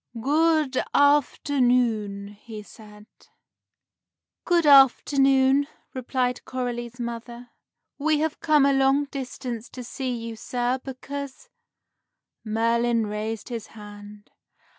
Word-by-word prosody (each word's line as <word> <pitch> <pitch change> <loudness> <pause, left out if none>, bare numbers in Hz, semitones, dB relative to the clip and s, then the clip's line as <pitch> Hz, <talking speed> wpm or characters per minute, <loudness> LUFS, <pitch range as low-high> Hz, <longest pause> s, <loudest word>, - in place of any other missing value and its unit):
"Good 300 +1 +2
afternoon," 245 -8 +2
he 210 +1 -11
said. 210 -1 -15 1.4
"Good 345 -2 +2
afternoon," 270 0 +5 0.3
replied 250 -1 -2
Coralie's 245 -1 -5
mother; 235 +1 -7 0.5
"we 310 +1 +2
have 315 +1 -2
come 300 -3 +3
a 280 - +3
long 270 +1 +3
distance 255 -4 -6
to 250 - -9
see 260 +2 -5
you, 230 -1 -5
sir, 245 +3 -2
because 280 - -8 0.5
" - - -59
Merlin 230 +1 +1
raised 210 +2 -5
his 230 -3 -6
hand. 205 0 -12
250 Hz, 100 wpm, -24 LUFS, 230-275 Hz, 1.4 s, afternoon